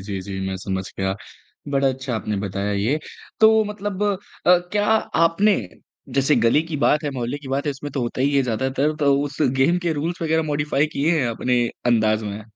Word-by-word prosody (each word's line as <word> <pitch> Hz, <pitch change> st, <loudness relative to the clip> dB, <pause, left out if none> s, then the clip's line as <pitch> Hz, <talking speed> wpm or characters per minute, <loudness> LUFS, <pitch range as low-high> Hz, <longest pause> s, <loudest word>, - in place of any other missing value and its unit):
जी, 95 Hz, 0 st, -5 dB
जी। 95 Hz, 0 st, -6 dB
मैं 95 Hz, 0 st, -3 dB
समझ 95 Hz, 0 st, -3 dB, 0.2 s
गया, 95 Hz, 0 st, 0 dB, 0.5 s
बड़ा 140 Hz, -1 st, +2 dB
अच्छा 130 Hz, -1 st, -3 dB
आपने 105 Hz, -1 st, -2 dB
बताया 100 Hz, +2 st, -2 dB
ये। 110 Hz, +10 st, 0 dB, 0.4 s
तो 220 Hz, 0 st, +6 dB
मतलब 205 Hz, -1 st, -4 dB
अ, 205 Hz, -2 st, +1 dB, 0.5 s
क्या 205 Hz, 0 st, +1 dB
आपने 200 Hz, -1 st, +3 dB, 0.6 s
जैसे 140 Hz, +2 st, +3 dB
गली 120 Hz, +7 st, +3 dB
की 165 Hz, -2 st, -5 dB
बात 150 Hz, +2 st, +2 dB
है, 145 Hz, -, -1 dB
मोहल्ले 130 Hz, +2 st, -3 dB
की 140 Hz, -2 st, -11 dB
बात 135 Hz, +1 st, -1 dB
है -, -, +2 dB
इसमें 145 Hz, +1 st, -6 dB
तो 135 Hz, -, -2 dB
होता 120 Hz, +2 st, -3 dB
ही 140 Hz, +1 st, +2 dB
है, 135 Hz, -, +4 dB
ज़्यादातर 130 Hz, +5 st, 0 dB
तो 140 Hz, -1 st, +4 dB
उस 145 Hz, -1 st, -5 dB, 0.2 s
गेम 170 Hz, +7 st, +3 dB
के 170 Hz, -2 st, -1 dB
रूल्स 165 Hz, +4 st, -3 dB
वगैरह 160 Hz, 0 st, +1 dB
मॉडिफ़ाई 145 Hz, -1 st, 0 dB
किए 155 Hz, +2 st, +2 dB
हैं 125 Hz, -, +1 dB
अपने 120 Hz, +1 st, 0 dB, 0.2 s
अंदाज़ 110 Hz, -2 st, +2 dB
में? 105 Hz, +1 st, -5 dB
140 Hz, 200 wpm, -22 LUFS, 115-160 Hz, 0.6 s, तो